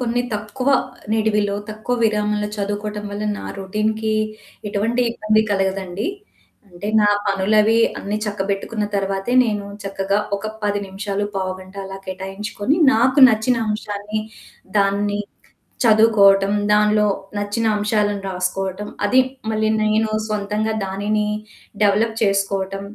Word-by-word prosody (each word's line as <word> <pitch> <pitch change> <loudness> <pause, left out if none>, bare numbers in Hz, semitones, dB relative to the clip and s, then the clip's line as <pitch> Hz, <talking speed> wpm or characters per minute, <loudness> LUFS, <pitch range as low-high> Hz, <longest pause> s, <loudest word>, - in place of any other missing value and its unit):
కొన్ని 245 0 0
తక్కువ 215 +6 -3 0.4
నిడివిలో, 210 -2 +1 0.2
తక్కువ 215 +3 -3
విరామంలో 210 -1 +1
చదువుకోవటం 205 +1 -3
వల్ల 205 +1 -4
నా - - -8
రొటీన్‌కి 215 +3 -1 0.6
ఎటువంటి 220 +4 0
ఇబ్బంది 215 -1 +2
కలగదండి. 195 - -1 0.6
అంటే 180 +3 -7
నా 210 - +4 0.2
పనులవి 210 +3 +3 0.2
అన్ని 205 +1 -3
చక్కబెట్టుకున్న 205 +1 -2
తరువాతే 195 +2 -1
నేను 205 -3 -2 0.2
చక్కగా 195 0 0 0.2
ఒక 200 - -10 0.2
10 205 -1 0
నిమిషాలు, 200 +1 -3
పావుగంట 185 0 -5
అలా 195 0 -7
కేటాయించుకొని 195 - -3 0.2
నాకు 260 +5 +3
నచ్చిన 230 +2 +2
అంశాన్ని 210 0 -3 0.6
దాన్ని 205 +1 +1 0.7
చదువుకోవటం, 205 -3 +5 0.2
దాన్లో 210 0 +4 0.3
నచ్చిన 205 +3 -1
అంశాలను 205 -1 0
రాసుకోవటం 190 +2 -3 0.2
అది 255 +5 +4 0.3
మళ్ళీ 215 0 +1 0.2
నేను 215 +1 +2 0.2
సొంతంగా 210 +1 -1
దానిని 210 +2 -1 0.6
డెవలప్ 215 +2 +2
చేసుకోవటం 195 -1 0
205 Hz, 110 wpm, -20 LUFS, 195-215 Hz, 0.7 s, చదువుకోవటం